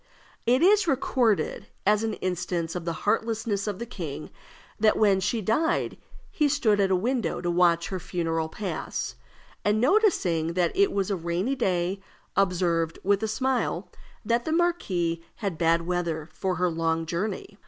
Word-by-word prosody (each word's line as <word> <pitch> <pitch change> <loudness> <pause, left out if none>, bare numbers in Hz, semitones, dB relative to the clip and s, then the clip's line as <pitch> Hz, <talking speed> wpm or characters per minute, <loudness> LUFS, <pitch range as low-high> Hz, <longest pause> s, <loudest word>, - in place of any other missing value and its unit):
It 255 +5 +4
is 400 0 +5
recorded, 250 -6 +1 0.2
as 210 +1 +4
an 220 -1 -1
instance 175 -2 -2
of 175 -2 -4
the 170 - 0
heartlessness 220 -1 0
of 205 -3 -2
the 235 - -5
king, 160 - -6 0.5
that 215 0 +4
when 200 -3 +4
she 220 +4 0
died 315 - +1 0.4
he 300 -2 +2
stood 240 -8 +2
at 195 -1 +3
a 190 - +3
window 230 -1 -1
to 175 -1 -1
watch 170 -1 +3
her 190 - -3
funeral 165 -2 -2
pass, 200 +3 -4 0.5
and 210 +1 +2
noticing 230 - +2
that 175 -1 +1
it 400 0 +4
was 200 0 -1
a - - +1
rainy 175 +8 -1
day, 190 -6 0 0.3
observed, 170 -4 +1
with 200 +1 +2
a 220 - 0
smile, 215 -6 -1 0.3
"that 235 +2 +1
the 315 - -3
marquise 195 - +1 0.2
had 195 -7 -4
bad 165 0 +3
weather 170 -3 -2
for 190 -1 -1
her 180 0 +1
long 165 0 0
journey." 195 +4 -4
190 Hz, 165 wpm, -26 LUFS, 170-230 Hz, 0.5 s, is